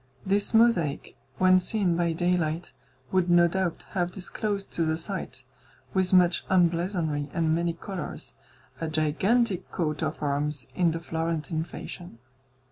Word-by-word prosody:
This 200 +1 +1
mosaic, 220 -11 +2 0.2
when 185 0 +5
seen 185 -2 0
by 170 -1 +1
daylight, 175 -2 0 0.4
would 185 -1 +2
no 175 0 +6
doubt 185 -1 -2
have 175 -2 -1
disclosed 200 +2 -3
to 170 - -1
the 160 0 0
sight, 190 +4 -5 0.5
with 190 -2 +2
much 180 -2 +4
emblazonry 170 -4 +1
and 160 -2 +2
many 170 +1 0
colours, 185 +2 -6 0.5
a 165 - -2
gigantic 180 +8 +1
coat 155 -4 -2
of - - -2
arms, 145 -2 0
in 175 -2 +2
the 165 0 -2
Florentine 160 -1 -2
fashion. 175 -6 -9
175 Hz, 135 wpm, -27 LUFS, 160-185 Hz, 0.5 s, no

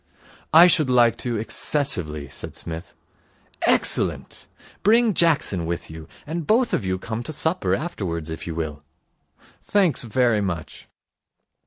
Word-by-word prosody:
'I 165 +2 +8
should 160 -6 +3
like 120 -2 +4
to 120 -2 -3
excessively,' 100 - 0
said - - -8
Psmith. 80 +2 -8 0.7
'Excellent. - - +2 0.3
Bring 225 +2 +3
Jackson 145 - +1
with 85 -1 -5
you, 80 0 -10 0.2
and 160 +1 -5
both 235 +3 +2
of - - 0
you 95 0 -2
come 110 +4 -5
to 120 - -5
supper 155 - -1
afterwards, 90 - -5
if 80 - -7
you 80 - -5
will.' 75 -3 -5 0.9
'Thanks 190 -9 +2
very 120 -2 +1
much.' 85 -5 -6
115 Hz, 135 wpm, -22 LUFS, -, 0.9 s, I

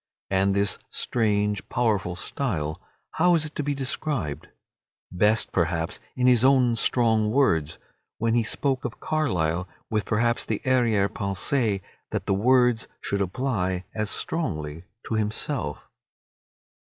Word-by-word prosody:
And 95 +1 +2
this 100 -1 +1
strange, 105 -3 0
powerful 105 -7 0
style, 90 - -3 0.3
how 175 +1 +3
is 160 -2 +1
it 155 - -7
to - - -2
be 145 0 -1
described? 130 - -2 0.6
Best, 105 +5 +2
perhaps, 85 -1 -1 0.2
in 125 - 0
his 125 -2 +5
own 130 -3 +4
strong 115 -2 +2
words, 85 - +2 0.4
when 115 0 +1
he 120 - +4
spoke 130 +3 0
of - - -5
Carlyle 90 - 0 0.2
with 105 -3 0
perhaps 120 +2 +1
the 110 - -2
arrière 120 -6 +3
pensée 100 +2 -1 0.3
that - - -3
the 100 - +1
words 125 +2 +3 0.2
would 100 0 +1
apply 95 -3 -1
as 105 -2 -2
strongly 80 - -3 0.2
to - - -3
himself. 110 - -2
110 Hz, 130 wpm, -25 LUFS, 95-125 Hz, 0.6 s, his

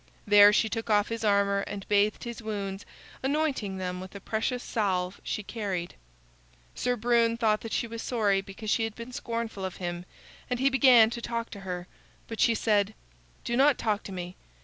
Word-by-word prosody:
There 205 0 +8
she 215 +1 +3
took 225 0 -4
off 205 -1 +3
his 230 0 -4
armor 200 -1 +3
and 200 -1 -6
bathed 205 +1 +2
his 235 -1 -6
wounds, 200 -3 -5 0.3
anointing 270 -8 -1
them 180 -1 -4
with 190 +2 -10
a - - -6
precious 230 +4 -2
salve 185 -4 -1
she 210 - -3
carried. 195 -5 -4 0.8
Sir 250 0 0
Brune 235 0 +2
thought 215 -2 +2
that 225 - -7
she - - 0
was 230 0 -6
sorry 205 -5 +1
because 200 +2 -6
she 225 - +2
had 225 -1 -6
been 235 +2 -8
scornful 230 -6 -4
of 190 -1 -4
him, 175 -1 -4 0.4
and 250 -1 -1
he 275 +1 +3
began 250 -5 +6
to 235 - -5
talk 230 0 -3
to 200 - -8
her. 180 -2 -5 0.4
But 225 - -7
she 230 - +4
said: 210 -1 +1 0.5
"Do 235 - -1
not 275 +1 +5
talk 210 -2 0
to - - -7
me. 180 -1 -6
215 Hz, 195 wpm, -28 LUFS, 195-235 Hz, 0.8 s, There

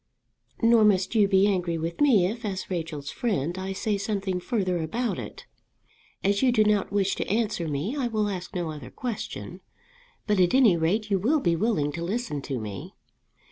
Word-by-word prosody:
"Nor 230 -1 +6
must 195 -2 +3
you 210 -3 +4
be 195 0 +4
angry 180 -4 0
with 165 - -4
me 240 -11 +5
if, 230 +6 -3
as 195 -3 -4
Rachel's 160 -5 -4
friend, 175 - -1
I 190 +1 -4
say 200 +1 -1
something 195 -2 -2
further 185 -4 -1
about 230 +10 -2
it. - - -8 0.8
As 200 +1 +2
you 260 -2 +4
do 215 -3 +4
not 210 -2 +1
wish 200 -1 +1
to - - -3
answer 210 -5 0
me, 155 - -2
I 270 -4 0
will 215 -2 0
ask 185 -3 -5
no 175 -3 -2
other 145 -5 -8
question; 240 -4 -6 0.6
but 210 -3 +1
at 180 +5 +4
any 240 -9 +6
rate 200 +7 0
you 195 - +3
will 280 - +2
be 170 -10 +1
willing 165 -7 0
to 165 +3 -5
listen 195 - -2
to 135 -1 -4
me. 105 -3 -7
195 Hz, 190 wpm, -26 LUFS, 170-220 Hz, 0.8 s, Nor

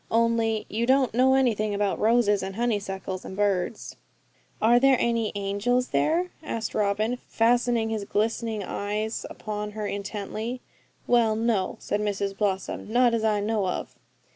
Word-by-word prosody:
Only 230 -1 +1
you 230 +3 -2
don't 265 -2 +3
know 260 +2 +4
anything 215 -5 +1
about 200 -1 0
roses, 220 -2 +3
and 190 0 -5
honeysuckles, 200 -5 -2
and 190 - -8
birds.' 205 0 -1 0.6
'Are 235 +2 +5
there 270 0 +5
any 230 -2 +1
angels 205 +6 0
there?' 325 - +1
asked 230 -8 -4
Robin, 215 +4 0
fastening 235 0 +2
his 215 -2 -2
glistening 220 0 -1
eyes 210 +3 -3
upon 210 -1 -5
her 215 0 -4
intently. 210 +4 -4 0.5
'Well, 230 -3 +3
no,' 220 -4 0
said 205 - -2
Mrs 200 -1 -2
Blossom, 195 +1 -2
'not 240 0 +4
as 230 -1 0
I 210 -2 +2
know 210 -2 0
of.' 180 - -4
220 Hz, 145 wpm, -26 LUFS, 205-235 Hz, 0.6 s, Are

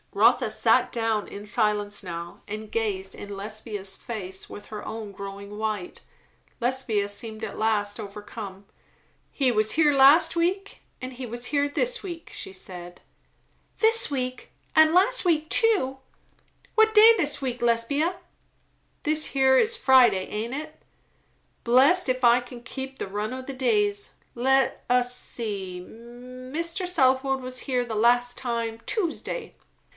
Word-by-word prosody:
Rotha - - +4
sat - - +2
down, 225 -3 -1
in 205 +1 -9
silence 210 -2 -1
now, 170 -1 -7
and 215 +1 -7
gazed 195 -4 -2
in 200 -1 -8
Lesbia's 205 -1 -5
face 190 -5 -7
with 205 - -10
her 210 -1 -8
own 220 -2 -6
growing 200 +1 -8
white. 215 -4 -4 0.6
Lesbia 240 -5 0
seemed 220 +2 -5
at 205 - -8
last 210 -2 0
overcome. 205 -1 -8 0.7
"He 265 -3 +1
was 215 0 +1
here 300 -2 +4
last 280 +6 +6
week, 370 +4 -1 0.2
and 255 0 -6
he 255 +1 -7
was 240 +1 -3
here 285 +1 0
this 480 +9 0
week," 340 -4 -8
she - - -6
said. 175 -2 -8 0.8
"This 455 +1 +5
week! 255 -2 -4 0.2
and 315 0 +6
last - - +3
week 315 -4 +1
too. 380 - +1 0.8
What 440 0 +4
day 440 +2 +9
this 300 -8 0
week, 250 -2 -3
Lesbia?" 280 +9 +1 0.9
"This 310 0 +2
here 265 -1 +3
is 460 - +2
Friday, 245 - +5
aint 220 +4 -4
it. 310 +2 -8 0.8
Blessed 270 +8 +4
if 255 0 -1
I 240 +1 +5
kin 245 -1 -11
keep 265 +1 -7
the - - -4
run 210 +4 -4
o' 260 0 -6
the 275 - -7
days. 410 - 0 0.2
Let 265 +2 +1
us 250 0 +3
see 195 -6 -5
Mr. 255 - -6
Southwode 270 -5 +2
was 255 0 -5
here 250 -2 -1
the 225 -2 -5
last 245 +2 +3
time, 230 -2 -3
Tuesday." 445 +4 -3
245 Hz, 145 wpm, -25 LUFS, 215-285 Hz, 0.9 s, day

